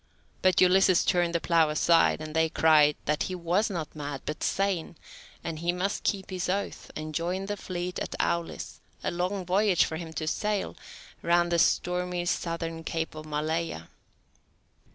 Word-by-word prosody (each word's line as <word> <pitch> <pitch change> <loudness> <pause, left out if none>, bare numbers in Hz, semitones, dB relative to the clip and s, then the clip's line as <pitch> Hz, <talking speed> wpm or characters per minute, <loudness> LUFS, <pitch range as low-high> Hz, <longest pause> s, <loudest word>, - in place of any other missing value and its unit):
But 185 -1 +4
Ulysses 185 0 +5
turned 175 -2 +2
the - - +3
plough 165 -2 +3
aside, 165 +1 +3
and 155 0 -6
they 160 0 +3
cried 155 -2 +5
that 150 0 0
he 185 - -3
was 180 +5 +1
not 170 -6 -5
mad, 145 -2 -5
but 150 - -4
sane, 195 -4 0 0.5
and 165 -2 -4
he 170 +1 +1
must 185 +3 -2
keep 195 -2 -2
his 180 -1 -2
oath, 200 +2 -3
and 155 0 -5
join 180 +4 -2
the 205 +1 -3
fleet 180 -2 -4
at - - -4
Aulis, 170 -1 -2 0.2
a - - 0
long 180 +2 -2
voyage 190 0 +3
for 160 - -4
him 165 -1 -7
to 155 0 -3
sail, 210 +5 -1 0.5
round 175 0 +2
the 170 - +3
stormy 180 +1 +1
southern 165 -1 -2
Cape 160 0 -3
of 155 0 -9
Maleia. 155 - -2
170 Hz, 170 wpm, -28 LUFS, 160-185 Hz, 0.5 s, Ulysses